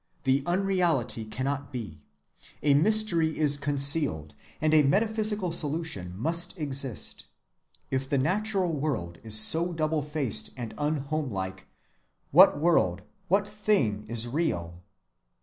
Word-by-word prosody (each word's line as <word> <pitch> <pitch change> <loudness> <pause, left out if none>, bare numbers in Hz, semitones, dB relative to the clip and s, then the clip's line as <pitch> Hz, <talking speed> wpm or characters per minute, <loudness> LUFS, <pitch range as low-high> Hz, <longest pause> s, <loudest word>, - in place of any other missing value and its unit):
The 135 0 +2
unreality 175 - 0
cannot 135 +6 -4
be. 105 - -7 0.6
A 145 -1 +4
mystery 170 -1 +3
is 150 -2 +3
concealed, 140 - +1 0.3
and 155 0 +1
a 155 - +6
metaphysical 210 +4 +1
solution 150 - -2
must 170 - -1
exist. 140 -6 -3 0.6
If 135 0 -2
the 140 - +1
natural 185 +4 0
world 130 - -3
is 110 -1 +4
so 165 +10 +4
double‐faced 150 - -2
and 115 -3 -6
unhomelike, 140 -11 -3 0.6
what 145 - +6
world, 100 - +1 0.2
what 195 +2 +1
thing 205 - -1
is 115 +1 0
real? 90 - -3
145 Hz, 115 wpm, -27 LUFS, 115-170 Hz, 0.6 s, a